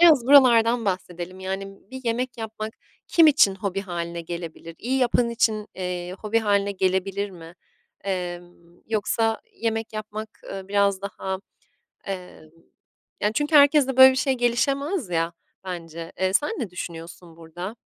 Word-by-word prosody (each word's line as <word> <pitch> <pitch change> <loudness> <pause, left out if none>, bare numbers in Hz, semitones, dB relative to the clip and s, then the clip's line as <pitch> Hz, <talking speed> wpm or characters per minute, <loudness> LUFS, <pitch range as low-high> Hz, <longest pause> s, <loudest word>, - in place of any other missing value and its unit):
Biraz 310 -8 +6
buralardan 240 -4 +6
bahsedelim. 185 -1 -4
Yani, 190 +1 -3 0.2
bir 260 - -7
yemek 235 +1 -2
yapmak 220 0 -5 0.4
kim 330 -2 +6
için 205 -10 +5
hobi 195 0 -3
hâline 170 -2 -4
gelebilir? 165 -1 -7
İyi 260 +3 -1
yapan 240 -1 +2
için, 220 -2 +1
eee, 180 -1 -4
hobi 220 +1 0
hâline 200 -2 +1
gelebilir 195 +1 0
mi? 170 -1 -12 0.5
Emm, 175 -2 -6
yoksa 225 +1 0
yemek 225 -1 -3
yapmak, 215 0 -5 0.2
ııı, 195 0 -7
biraz, 200 -1 +2
daha, 190 -1 -4 0.7
emm, 180 -5 -7 0.7
yani, 210 - +1
çünkü 295 +3 +2
herkeste 285 -2 +5
böyle 260 0 +10
bir - - -4
şey 270 -1 +1
gelişemez 275 - 0
ya, 165 0 0 0.3
bence. 170 -2 -7
Eee, 190 0 +2
sen 290 +9 +2
ne 210 - -3
düşünüyorsun 170 -1 -8
burada? 175 +6 -7
200 Hz, 140 wpm, -24 LUFS, 180-235 Hz, 0.7 s, böyle